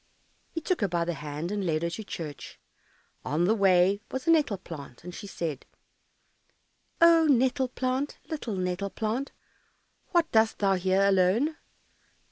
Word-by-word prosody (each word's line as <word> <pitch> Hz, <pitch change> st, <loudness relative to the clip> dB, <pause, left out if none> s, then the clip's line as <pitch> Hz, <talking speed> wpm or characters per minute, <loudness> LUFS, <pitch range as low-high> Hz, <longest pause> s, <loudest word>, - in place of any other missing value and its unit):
He 330 Hz, -, -5 dB
took 355 Hz, -1 st, -1 dB
her 200 Hz, -, +2 dB
by 170 Hz, -2 st, -1 dB
the 175 Hz, -, -1 dB
hand 150 Hz, +3 st, -5 dB
and 205 Hz, -1 st, -2 dB
led 160 Hz, -2 st, 0 dB
her 170 Hz, -, 0 dB
to 220 Hz, -, -5 dB
church. 155 Hz, -7 st, -8 dB, 0.6 s
On 155 Hz, +6 st, 0 dB
the 210 Hz, -, +3 dB
way 195 Hz, -1 st, +3 dB
was 260 Hz, 0 st, -4 dB
a 330 Hz, -, +4 dB
nettle 295 Hz, -11 st, +3 dB
plant, 150 Hz, -8 st, -10 dB
and 180 Hz, +1 st, -8 dB
she 200 Hz, -, -8 dB
said, 160 Hz, -7 st, -5 dB, 1.3 s
"Oh, 335 Hz, -1 st, +6 dB
nettle 260 Hz, 0 st, +3 dB
plant, 260 Hz, +3 st, -2 dB
Little 270 Hz, -9 st, -4 dB
nettle 185 Hz, +1 st, -2 dB
plant, 225 Hz, +7 st, -3 dB, 0.8 s
What 345 Hz, -2 st, +2 dB
dost 220 Hz, 0 st, +3 dB
thou 195 Hz, -1 st, +2 dB
here 190 Hz, +1 st, +2 dB
alone? 200 Hz, -, +3 dB
200 Hz, 155 wpm, -28 LUFS, 175-255 Hz, 1.3 s, Oh